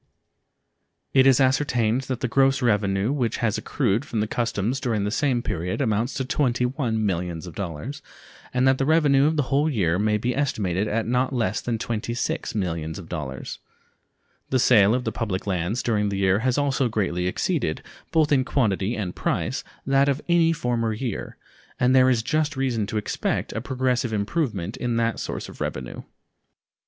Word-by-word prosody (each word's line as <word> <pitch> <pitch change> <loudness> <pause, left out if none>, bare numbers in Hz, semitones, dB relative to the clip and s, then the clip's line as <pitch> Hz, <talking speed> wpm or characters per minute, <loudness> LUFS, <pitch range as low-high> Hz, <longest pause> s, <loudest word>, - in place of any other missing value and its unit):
It 135 0 +6
is 135 -1 +5
ascertained 130 -3 +2
that 130 -2 -2
the 125 - 0
gross 135 +1 +2
revenue 105 -1 +1
which 125 -5 -1
has 110 -3 0
accrued 115 -3 0
from 115 - -3
the 105 - +1
customs 115 +2 -1
during 115 -6 -1
the 105 - -1
same 130 -2 +1
period 90 +2 -3
amounts 115 -1 0
to 130 - -2
$21 125 -2 0
millions, 90 -5 -2 1.0
and 125 +1 +2
that 130 0 +3
the 135 - +1
revenue 145 -3 +4
of 160 - +1
the 145 - +3
whole 145 +3 +3
year 90 - +1
may 105 0 +2
be 120 +3 -1
estimated 105 -8 0
at 110 +1 -1
not 125 +3 0
less 110 -4 0
than 120 -2 -2
$26 115 +1 -3
millions. 80 -4 -2 1.5
The 130 - +2
sale 110 -4 +5
of 125 - -1
the - - -2
public 100 -5 -3
lands 95 +4 -1
during 105 -3 +1
the 100 - -2
year 95 +1 +3
has 125 +2 0
also 135 -3 +1
greatly 90 -5 -1
exceeded, 90 - -1 0.3
both 155 -2 +2
in 135 -3 +4
quantity 110 -5 0
and 95 -4 -4
price, - - -1 0.2
that 135 +1 +3
of 140 0 0
any 170 -1 +4
former 120 -7 -1
year, 115 -1 -4 0.4
and 125 +1 +3
there 130 0 +6
is 120 -3 +2
just 155 +1 0
reason 120 -6 0
to 110 - -3
expect 105 - -2
a 110 - -3
progressive 125 -2 -1
improvement 105 - -2
in 120 -2 -1
that 115 0 0
source - - -4
of - - -12
revenue. 65 -2 -4
120 Hz, 170 wpm, -24 LUFS, 105-130 Hz, 1.5 s, It